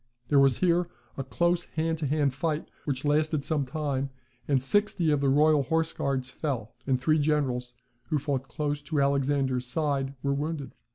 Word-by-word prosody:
There 145 - +5
was 135 -2 +5
here 175 -1 +2 0.3
a 135 - -3
close 175 +6 +1
hand 160 0 -2
to 150 - -1
hand 145 -1 +1
fight, 155 +3 -2 0.2
which 135 -1 -2
lasted 150 0 +2
some 145 -2 -1
time, 140 -1 -2 0.4
and 140 -2 +3
sixty 175 +3 +1
of 145 -2 +2
the 140 - +3
royal 150 +2 +5
horse 160 +3 0
guards 135 -2 -1
fell, 130 -6 -4
and 130 -2 +2
three 155 +4 +3
generals, 130 -5 0 0.3
who 155 - 0
fought 140 -2 -2
close 145 -1 -2
to 150 0 -2
Alexander's 140 -2 +1
side, 140 0 -1
were 140 0 +1
wounded. 145 0 -3
145 Hz, 175 wpm, -28 LUFS, 135-155 Hz, 0.4 s, There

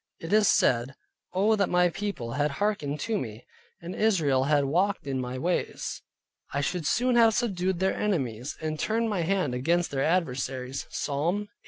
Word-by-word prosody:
It 165 +4 -4
is 215 -1 +5
said, 125 +3 +2 0.4
"Oh, 205 +4 +3
that 200 -2 +1
my 180 0 +4
People 195 - -4
had 145 +4 +1
hearkened 175 -9 -1
to 220 -2 -1
me, 110 -1 -7 0.3
and 170 +2 -7
Israel 155 -12 +2
had 145 -1 +3
walked 185 +7 +1
in 135 -2 -2
my 125 +1 -4
ways, 175 +7 -2 0.5
I 140 - -1
should 155 +2 -1
soon 250 +1 +2
have 225 -2 +5
subdued 190 -6 0
their 190 +2 +1
Enemies, 130 - -2
and 155 -1 -3
turned 225 +1 0
my 190 -4 0
hand 180 -5 0
against 170 +8 +1
their 135 -1 0
Adversaries" 135 -6 -1
(Psalm 150 +5 -1
81. 210 - -8
170 Hz, 175 wpm, -27 LUFS, 135-200 Hz, 0.5 s, is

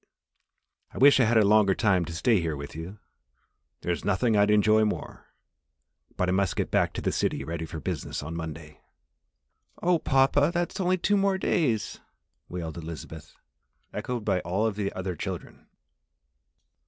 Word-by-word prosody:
I - - -12
wish 140 0 +6
I 125 - +5
had 115 +1 +3
a 110 - +5
longer 100 -2 +4
time 95 -6 +2
to 80 - -7
stay 105 +3 +2
here 80 -2 -2
with 70 +1 -8
you 85 +6 -7 0.8
there's 85 -1 -2
nothing 110 +3 +1
I'd 105 0 +4
enjoy 110 +1 +4
more, 105 - -4 0.9
but 90 - +1
I - - +1
must 95 -2 +1
get - - -2
back - - +2
to - - -4
the - - +1
city - - -1
ready 80 0 -5
for 80 +1 -6
business 80 -4 -4
on 80 +2 -6
Monday." 80 -2 -7 1.0
"Oh, 175 -1 +2
papa! 135 +2 +3
That's 175 +3 -2
only 185 0 +2
two 195 +1 +2
days 140 - 0
more!" - - -34 0.4
wailed 85 -2 -5
Elizabeth, 80 -1 -9 0.6
echoed 120 -4 -4
by 95 -3 +1
all 95 +5 -1
of 110 -3 -1
the 100 -1 -2
other 95 -1 -4
children. - - -7
100 Hz, 165 wpm, -27 LUFS, 85-125 Hz, 1.0 s, wish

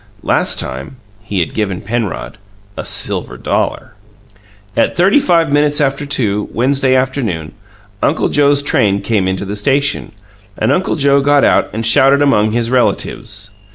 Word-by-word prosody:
Last - - +1
time 65 - -5 0.3
he 105 -3 -2
had 85 - -3
given 100 -4 -2
Penrod 105 -3 -4 0.4
a - - -5
silver - - -1
dollar. - - -2 0.8
At - - +1
thirty 195 +10 +4
five 170 - +2
minutes 145 0 +2
after 140 0 -1
two, 105 -7 -1
Wednesday 130 +2 +1
afternoon, 125 - -2 0.5
Uncle 155 - +1
Joe's 145 -1 +2
train 100 -7 +1
came 105 -5 0
into 95 +1 -2
the 100 +2 -5
station, 140 +7 0 0.5
and - - +1
Uncle 190 - 0
Joe 140 -2 +3
got 145 0 +3
out - - +3
and 110 +1 -4
shouted 135 +5 +4
among 110 -7 +3
his 115 +1 -1
relatives. 110 -4 -1
130 Hz, 150 wpm, -15 LUFS, 105-140 Hz, 0.8 s, thirty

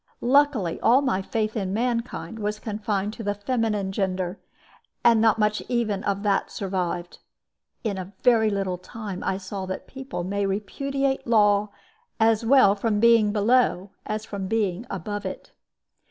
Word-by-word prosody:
Luckily 255 - +2
all 255 +5 +4
my 195 -8 +1
faith 215 +3 -2
in 195 -3 -2
mankind 230 -1 -2
was 210 0 -2
confined 210 -1 -2
to 230 - -7
the 205 0 -1
feminine 210 -3 -1
gender, 190 -1 -2 0.6
and 230 -2 +5
not 225 -1 +4
much 210 -1 +1
even 220 -5 0
of 200 0 -1
that 200 -2 +1
survived. 180 -3 -3 0.6
In 205 -4 -2
a 185 +1 -7
very 225 -3 +5
little 195 -3 -2
time 205 -1 -7
I 190 - 0
saw 190 0 -6
that 185 - -5
people 265 -8 -6
may 200 +2 -1
repudiate 270 +8 -2
law 210 -2 +4 0.5
as 225 0 +3
well 235 -4 +6
from 210 +1 0
being 230 -2 +5
below 205 -3 +2 0.2
as 215 0 -3
from 195 -2 -5
being 215 0 -1
above 205 +3 -4
it. - - -7
210 Hz, 155 wpm, -25 LUFS, 195-230 Hz, 0.6 s, well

